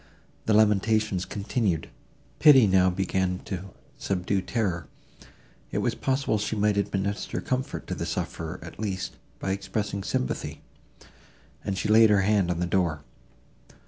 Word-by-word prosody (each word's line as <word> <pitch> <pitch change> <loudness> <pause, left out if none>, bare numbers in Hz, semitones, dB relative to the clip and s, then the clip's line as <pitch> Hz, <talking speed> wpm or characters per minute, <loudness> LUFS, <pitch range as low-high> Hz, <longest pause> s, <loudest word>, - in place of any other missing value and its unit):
The 110 - +4
lamentations 105 -2 +3
continued. 100 - -1 0.5
Pity 135 -6 +8
now 95 -2 +4
began 95 0 0
to 95 -1 -4 0.3
subdue 95 0 0
terror; 90 - -2 0.8
it - - -2
was - - +1
possible 130 -5 0
she 105 +2 -2
might 105 0 +2
administer 100 0 -1
comfort 130 +1 -3
to - - -4
the - - -3
sufferer, 80 +2 -4
at - - -11
least, 95 -3 -3 0.2
by 95 - -3
expressing 100 +1 -2
sympathy, 65 - -3 1.0
and 95 - -2
she 100 - -1
laid 110 +1 +7
her 105 -2 +4
hand 100 -2 +2
on 85 -1 -1
the 90 - +1
door. 85 -5 0
100 Hz, 140 wpm, -26 LUFS, 90-105 Hz, 1.0 s, Pity